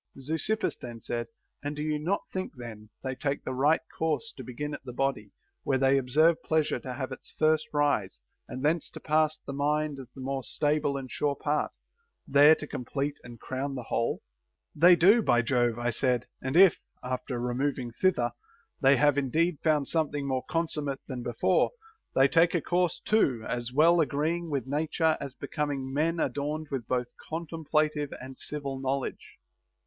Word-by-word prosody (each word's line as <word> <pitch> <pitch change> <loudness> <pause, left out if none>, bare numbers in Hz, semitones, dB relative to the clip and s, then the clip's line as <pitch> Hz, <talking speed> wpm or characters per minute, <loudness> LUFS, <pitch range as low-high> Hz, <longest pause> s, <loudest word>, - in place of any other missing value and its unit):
4. 135 - -12
Zeuxippus 220 +7 -1
then 120 -2 -8
said: 120 0 -3 0.3
And 145 +1 -4
do 150 - -3
you 155 -1 -1
not 175 +7 0
think 185 0 -3
then 110 -4 -9
they 130 -1 -2
take 140 +1 -2
the 130 - -3
right 145 +5 +3 0.2
course 160 +8 -1
to 130 - -8
begin 145 +5 -5
at - - -7
the 130 - -7
body, 125 -6 -1 0.3
where 135 - +1
they 135 +1 +4
observe 155 +6 +3
pleasure 155 -1 +1
to 125 -2 -6
have 130 -1 -4
its - - -9
first 155 0 +3
rise, 140 - 0 0.2
and 130 +3 -5
thence 160 +1 +1
to - - -10
pass 155 0 +2
to - - -28
the 140 - -5
mind 150 +1 0
as 130 -3 -10
the 135 - -14
more 135 +1 -2
stable 145 +1 0
and 130 -2 -7
sure 145 -1 0
part, 150 +2 -1 0.6
there 145 +3 +7
to 155 - -7
complete 140 +2 -3
and 120 -1 -11
crown 135 +1 -4
the 125 - -5
whole 115 - -1 0.3
\ - - -51
They 175 +4 +7
do, 200 +8 +6
by 120 - +3
Jove, 120 -2 +1
I 120 0 0
said; 125 0 +1 0.2
and 130 +5 -1
if, 190 -2 +7 0.2
after 125 0 -3
removing 125 0 -1
thither, 120 -3 +1 0.5
they 135 -1 +6
have 145 +1 +4
indeed 155 +5 +1
found 150 -3 +2
something 150 -3 0
more 130 -1 -1
consummate 150 -4 -1
than 130 -3 -5
before, 120 - +1 0.4
they 135 +1 +6
take 165 +4 +4
a 170 - +2
course 175 0 +1
too 130 - +1
as 120 0 -3
well 165 +5 +5
agreeing 160 +3 -1
with 140 -5 -1
nature 155 +3 +1
as 140 -2 -6
becoming 140 -3 -3
men 165 +4 +1
adorned 150 +1 -2
with 130 -5 -3
both 125 -1 -1 0.2
contemplative 155 -2 -1
and 130 0 -9
civil 140 -3 -4
knowledge. 135 0 -3
140 Hz, 185 wpm, -28 LUFS, 130-155 Hz, 0.6 s, there